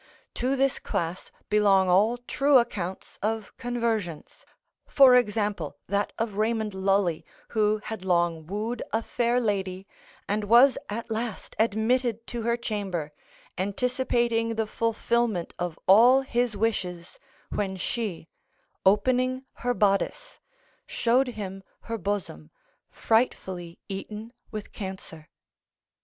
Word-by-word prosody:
To 260 +3 0
this 270 0 +1
class 170 +2 -3 0.2
belong 200 -3 +4
all 205 +7 +4
true 275 +3 +3
accounts 190 -7 -2
of 220 0 -2
conversions; 230 -9 -3 0.4
for 265 -3 +7
example, 210 -10 0
that 200 +1 -1
of 220 -3 -2
Raymond 220 -1 0
Lully, 190 -3 +1 0.3
who 215 -1 +2
had 220 -4 -6
long 170 -3 +1
wooed 215 +5 -3
a 225 +1 0
fair 240 +1 +1
lady, 195 -4 -2 0.4
and 205 +1 -1
was 240 +5 +6
at 225 +2 -5
last 225 -1 -4
admitted 230 +1 +1
to 240 -1 -5
her 235 +1 +1
chamber, 195 -9 -3 0.5
anticipating 230 +2 0
the 220 0 0
fulfilment 230 -3 0
of 175 -2 -3
all 240 +7 +7
his 245 -4 -1
wishes, 180 -6 -2 0.3
when 190 -2 -2
she, 195 -4 -3 0.6
opening 255 +6 +2
her 245 0 -2
bodice, 210 - 0 0.5
showed 250 +3 +2
him 195 -5 -6 0.2
her 230 -1 -5
bosom 175 - -3 0.4
frightfully 185 -7 -1
eaten 210 +4 -7 0.2
with 215 -2 -7
cancer. 190 -6 -8
215 Hz, 115 wpm, -27 LUFS, 190-235 Hz, 0.6 s, for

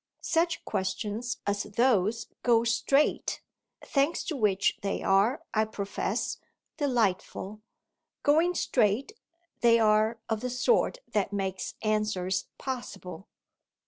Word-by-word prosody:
Such 335 0 0
questions 210 +5 -2
as 200 0 0
those 220 0 +1 0.2
go 235 -2 +4
straight 245 +5 +1 0.4
thanks 280 +4 +1
to 320 - -3
which 205 -6 +1
they 195 - -2
are, 210 +11 +3
I 215 0 +3
profess, 200 -2 -3 0.4
delightful; 215 - -1 0.6
going 325 +5 +3
straight 235 - +1 0.5
they 235 -1 +5
are 215 0 +3
of 220 -1 -1
the 250 - -2
sort 460 - +1
that 205 -2 +1
makes 190 -2 -3
answers 210 -4 0
possible. 195 -8 -6
220 Hz, 110 wpm, -28 LUFS, 200-255 Hz, 0.6 s, they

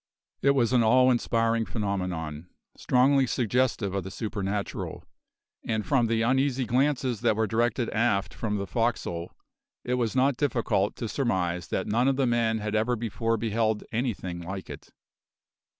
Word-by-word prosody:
It 140 0 +4
was 125 -2 +2
an 125 - +5
awe 125 +3 +5
inspiring 115 -1 +1
phenomenon, 90 -6 -3 0.3
strongly 130 +1 +3
suggestive 120 -4 0
of 100 -1 -2
the 95 - -6
supernatural, 100 -1 -4 0.6
and 110 -2 -2
from 130 -5 +2
the 115 0 +1
uneasy 130 +1 +1
glances 125 -1 +1
that 115 -3 +2
were 110 +1 +1
directed 120 +3 0
aft 110 -3 +1
from 105 -2 -2
the 100 - -3
forecastle 100 -6 -2 0.5
it 125 - -2
was 115 0 -1
not 130 0 +3
difficult 115 -8 0
to 115 - -4
surmise 90 - -1
that - - -2
none 120 +5 +1
of 135 - +3
the 135 0 +1
men 115 -2 +1
had 105 -1 -4
ever 110 +3 +1
before 115 0 -1
beheld 110 -1 0
anything 110 -7 -2
like 95 +2 -6
it. - - -10
115 Hz, 155 wpm, -27 LUFS, 100-125 Hz, 0.6 s, an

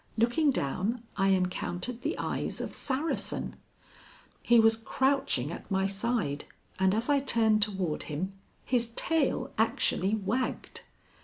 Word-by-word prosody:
Looking 240 +7 +3
down, 220 - -1
I 195 -1 +2
encountered 190 +5 0
the - - -2
eyes - - -3
of - - -4
Saracen. 290 +3 -2 0.9
He 240 -1 +5
was 225 0 +6
crouching 245 - 0
at - - -8
my 190 0 +1
side, 195 -7 -1 0.3
and 190 +1 +3
as 225 +2 0
I 285 -1 +4
turned 225 -5 +3
toward 190 -7 0
him, 180 +6 -3 0.3
his 240 -2 +1
tail 280 -4 +1
actually 215 -2 +2
wagged. 220 +5 -2
225 Hz, 130 wpm, -29 LUFS, 190-250 Hz, 0.9 s, was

